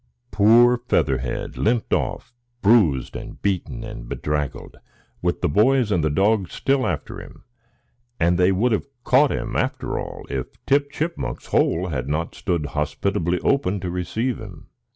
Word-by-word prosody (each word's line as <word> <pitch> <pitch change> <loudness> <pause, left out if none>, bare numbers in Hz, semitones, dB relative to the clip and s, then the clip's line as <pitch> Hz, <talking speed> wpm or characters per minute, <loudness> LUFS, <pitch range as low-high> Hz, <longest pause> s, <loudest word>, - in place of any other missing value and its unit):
Poor 120 +4 +5
Featherhead 65 -2 0
limped 115 +1 +1
off, - - -2 0.3
bruised 100 - +3
and - - -8
beaten 95 -4 -2
and - - -8
bedraggled, 75 -1 -3 0.4
with - - -1
the - - +2
boys 115 - +3
and 80 -6 +1
dog 100 -1 +2
still 135 -1 0
after 80 -5 -4
him; - - -14 0.8
and 85 +1 +3
they 90 +1 +4
would 110 +6 +2
have 110 - 0 0.2
caught 135 +3 +4
him, - - -3
after - - -1
all, - - -7
if 65 -2 -3 0.2
Tip 140 +1 +2
Chipmunk's 160 +3 -4
hole 90 +3 +1
had 65 -3 -3
not 80 +3 -2
stood 85 -5 -2
hospitably 85 +4 -1
open 120 -8 +1
to 90 -2 -3
receive 110 +8 -2
him. 95 -7 -11
95 Hz, 150 wpm, -22 LUFS, 80-120 Hz, 0.8 s, Poor